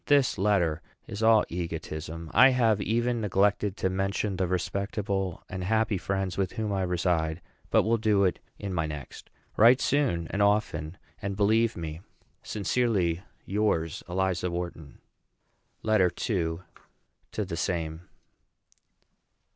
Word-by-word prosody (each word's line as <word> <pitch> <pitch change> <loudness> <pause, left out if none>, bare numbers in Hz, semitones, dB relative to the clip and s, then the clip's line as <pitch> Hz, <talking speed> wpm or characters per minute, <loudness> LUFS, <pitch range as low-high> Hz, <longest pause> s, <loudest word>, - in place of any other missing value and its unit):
This 140 -7 +3
letter 90 -6 +2 0.2
is 100 - -6
all 110 -1 +6
an - - -3
egotism. 80 -1 -5
I 130 - +8
have 115 -5 +2
even 120 +2 0
neglected 100 0 +1
to 95 - 0
mention 95 +1 -1
the 95 -1 0
respectable 95 +1 -2
and 95 0 -5
happy 110 0 +1
friends 95 0 -2
with 95 -2 0
whom 110 -3 -2
I 95 - 0
reside, 85 -3 0 0.3
but - - +4
will 115 +1 +1
do 105 -2 +3
it 95 - +1 0.2
in 100 -2 -5
my 80 -3 0
next. 75 -4 -8 0.3
Write 120 +4 +7
soon 130 - +1
and 100 - -1
often; 95 -5 +1 0.2
and 100 0 -3
believe 110 +2 +3
me 80 -1 -5 0.4
sincerely 100 -5 0 0.2
yours, 95 -6 0
ELIZA 90 0 0
WHARTON. 85 -4 -6 0.9
LETTER 105 -5 +4 0.2
II. 85 -5 -1 0.7
TO - - -2
THE - - -4
SAME. 80 -1 -2
95 Hz, 135 wpm, -28 LUFS, 85-105 Hz, 0.9 s, I